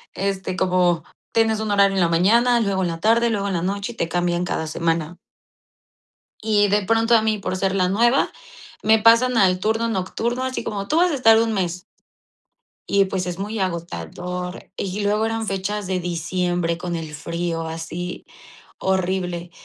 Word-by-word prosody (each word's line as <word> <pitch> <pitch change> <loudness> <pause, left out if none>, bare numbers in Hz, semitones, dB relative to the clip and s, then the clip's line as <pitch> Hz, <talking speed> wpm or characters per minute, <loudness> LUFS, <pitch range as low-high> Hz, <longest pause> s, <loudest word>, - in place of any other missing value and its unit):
Este, 195 -1 -2
como 180 -3 +2 0.3
tienes 225 -1 +2
un 220 0 -3
horario 200 -1 +4
en 190 - +2
la 170 - +4
mañana, 230 +8 +4
luego 200 -4 0
en 180 - +1
la 165 -1 -4
tarde, 230 +5 +3
luego 200 -3 -1
en - - -2
la 170 - -1
noche, 200 +5 -3
y - - -22
te 170 - -2
cambian 175 +1 0
cada 160 - -2
semana. 165 +1 -2 1.3
Y 210 -1 +3
de 205 +1 +2
pronto 225 +3 +3
a 220 - +3
mí, 220 -1 0
por 185 -1 -3
ser 190 0 0
la 185 -2 +2
nueva, 235 +7 +3 0.5
me 220 +1 +5
pasan 230 +3 +5
al 185 -3 +4
turno 225 +3 0
nocturno, 230 +5 -2
así 260 0 -3
como: 200 -1 -4
"Tú 305 - +1
vas 355 +1 +4
a - - -1
estar 225 -5 +5
un 225 0 0
mes" 180 -3 -2 1.1
y, 200 0 +4
pues, 190 -1 -3
es 175 0 -4
muy 210 +3 -4
agotador. 180 - -5
Y 195 +1 -3
luego 210 +2 +1
eran 225 0 -2
fechas 195 +1 -3
de 185 -1 0
diciembre 175 0 -1
con 175 -1 -4
el 160 -2 -6
frío, 170 +1 -3
así 165 +2 -6 0.5
horrible. 180 -2 -1
190 Hz, 180 wpm, -22 LUFS, 175-220 Hz, 1.3 s, me